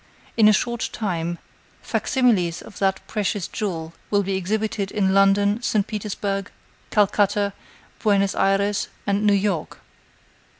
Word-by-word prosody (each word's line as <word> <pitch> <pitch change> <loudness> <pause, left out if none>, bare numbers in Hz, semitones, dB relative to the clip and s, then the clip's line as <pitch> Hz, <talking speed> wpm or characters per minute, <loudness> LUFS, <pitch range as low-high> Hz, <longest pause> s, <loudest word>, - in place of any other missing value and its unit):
In 220 -2 +6
a - - +8
short 235 +3 0
time, 175 -5 -2 0.5
fac - - -2
similes 210 - +2
of 215 - -12
that 190 -1 0
precious 205 -3 -2
jewel 165 -6 -4 0.2
will 205 -1 +2
be 195 0 -1
exhibited 205 +1 -1
in 195 -2 +1
London, 200 +2 +3
St. 215 -4 +1
Petersburg, 200 -2 -3 0.4
Calcutta, 205 -1 +2 0.5
Buenos 200 -2 +2
Ayres 200 +1 +1 0.2
and 200 0 0
New 205 - +5
York. 195 -5 -1
200 Hz, 130 wpm, -23 LUFS, 195-210 Hz, 0.5 s, a